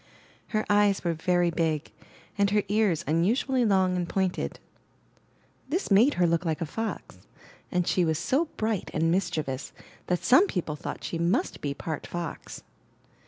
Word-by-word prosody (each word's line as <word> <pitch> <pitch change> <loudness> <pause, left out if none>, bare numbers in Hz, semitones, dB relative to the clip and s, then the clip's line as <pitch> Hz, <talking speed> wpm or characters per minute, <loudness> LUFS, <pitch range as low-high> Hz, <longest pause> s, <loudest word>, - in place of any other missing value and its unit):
Her 215 -1 -1
eyes 205 -1 +3
were 170 -2 +1
very 175 +1 +1
big, 160 -2 -1 0.4
and 200 -1 +2
her 205 0 +2
ears 205 -6 +2
unusually 230 - +1
long 190 -3 +3
and 175 -1 -2
pointed. 190 -2 -1 1.1
This 345 - -2
made 225 +9 +5
her 180 - +3
look 170 +1 +1
like 160 -3 -1
a 165 - -1
fox; 225 +8 -5 0.5
and 180 -2 +1
she 180 - +2
was 160 -2 +1
so 270 - +1
bright 215 -3 -1
and 165 +1 +2
mischievous 155 -7 -2 0.3
that 180 -1 0
some 355 +11 +6
people 165 - -3
thought - - -6
she 165 - -3
must 170 +2 0
be 140 -1 -2
part 155 -1 -5
fox. 170 -3 -6
180 Hz, 160 wpm, -27 LUFS, 165-205 Hz, 1.1 s, some